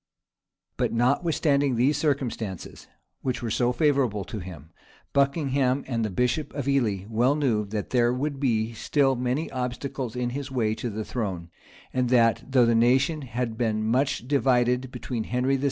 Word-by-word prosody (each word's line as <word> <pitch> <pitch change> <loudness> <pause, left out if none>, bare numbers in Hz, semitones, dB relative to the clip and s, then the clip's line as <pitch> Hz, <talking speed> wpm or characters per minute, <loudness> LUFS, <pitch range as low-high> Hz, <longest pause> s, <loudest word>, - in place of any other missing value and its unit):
But - - 0
notwithstanding 140 +2 +2
these 130 +6 +3
circumstances, 130 - -3 0.3
which 130 -2 -2
were 115 - -2
so 120 +3 +2
favorable 130 -8 +1
to 110 - -6
him, 85 -4 -10 0.4
Buckingham 140 -2 +1
and 115 -3 -2
the 110 - -1
bishop 125 - -1
of 140 -2 -3
Ely 115 -9 +1
well 120 +5 +2
knew 120 -8 +1
that 105 0 -4
there 120 -1 +3
would 140 +2 -3 0.4
still 135 +1 +2
be 120 - -5
many 125 +6 -1
obstacles 125 -1 -4
in 125 -1 -1
his 140 +1 -5
way 115 -5 0
to 120 - -4
the 110 0 -4
throne; 95 -8 -4 0.4
and 125 -1 +1
that, 115 -2 +3
though 130 -3 +5
the 115 - +3
nation 130 +7 +3
had 120 -3 -4
been 110 -2 0
much 130 +3 0
divided 125 -2 +2
between 115 -4 -4
Henry 125 +3 +1
VI. - - -7
125 Hz, 165 wpm, -26 LUFS, 115-135 Hz, 0.4 s, though